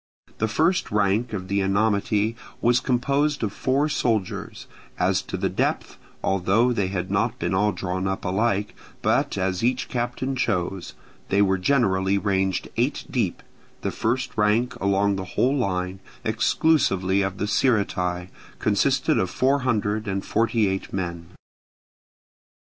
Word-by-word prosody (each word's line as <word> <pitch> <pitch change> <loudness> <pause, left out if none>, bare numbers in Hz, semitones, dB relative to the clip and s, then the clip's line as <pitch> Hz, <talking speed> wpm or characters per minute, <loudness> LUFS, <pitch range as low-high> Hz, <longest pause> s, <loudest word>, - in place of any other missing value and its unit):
The 110 - +1
first 165 - +1
rank 105 +3 +1
of 95 -3 -4
the 100 +1 0
Enomoty 105 +2 +1 0.2
was 120 +1 +3
composed 140 +3 0
of 105 -2 -1
four 135 +3 +1
soldiers: 110 -9 -2 0.3
as - - +2
to - - -5
the - - 0
depth, - - -1 0.3
although 100 +6 +2
they 100 -5 0
had 95 -1 -3
not - - 0
been - - -2
all 105 +3 +2
drawn 95 0 -3
up 95 0 -3
alike, 100 +1 0 0.3
but - - +1
as 95 +1 -1
each 125 +1 0
captain 125 +2 -2
chose, 95 -6 -2 0.3
they 100 - +2
were 95 -1 +1
generally 95 -5 +2
ranged 95 -1 0
eight 125 +5 0
deep; 110 -9 -1 0.4
the - - -2
first 125 +3 -1
rank 110 +4 +2
along 100 0 +2
the 95 - -4
whole 130 +3 +3
line, 95 -6 -1 0.2
exclusive 110 - +2
of 95 0 +1
the 100 - -1
Sciritae, 95 -6 0 0.3
consisted 130 +6 +2
of 95 - 0
four 135 +2 +2
hundred 110 -4 -1
and 95 -1 -2
forty 115 -1 +1
eight 95 0 -3
men. 85 -3 -4
105 Hz, 140 wpm, -24 LUFS, 95-120 Hz, 0.4 s, was